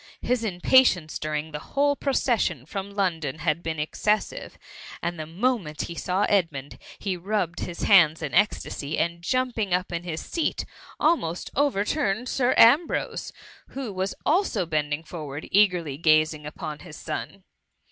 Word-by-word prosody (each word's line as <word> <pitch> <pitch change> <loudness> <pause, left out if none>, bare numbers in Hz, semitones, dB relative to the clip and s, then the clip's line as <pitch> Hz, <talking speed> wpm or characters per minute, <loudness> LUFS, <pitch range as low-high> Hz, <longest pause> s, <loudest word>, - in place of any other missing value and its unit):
His 250 -1 0
impatience 180 -3 +3
during 155 +1 -3
the 150 - -5
whole 285 - +1
procession 235 - 0
from 195 +4 -5
London 170 -8 -1
had 160 +1 0
been 160 -1 -3
excessive; 210 +7 -1 0.4
and 170 -1 -3
the 155 - -5
moment 180 -3 -1
he 170 - -6
saw 185 +3 -1
Edmund, 165 -10 0 0.2
he 195 -3 -2
rubbed 180 -1 -2
his 175 -1 -5
hands 165 -5 +5
in 145 - -4
ecstasy, 165 -6 0
and 170 0 -1
jumping 225 -1 0
up 180 +1 -3
in 170 -1 -2
his 170 -2 -4
seat 330 -3 -1 0.3
almost 180 - +1
overturned 250 -3 +1
Sir 255 -1 +1
Ambrose, 285 +9 +4 0.4
who 260 -6 -6
was 190 +1 -2
also 345 - +2
bending 150 -1 -1
forward 150 -3 -7
eagerly 180 -8 +3
gazing 155 -2 +3
upon 155 -1 -6
his 160 -3 -11
son. 195 -1 -6
180 Hz, 145 wpm, -25 LUFS, 155-215 Hz, 0.4 s, hands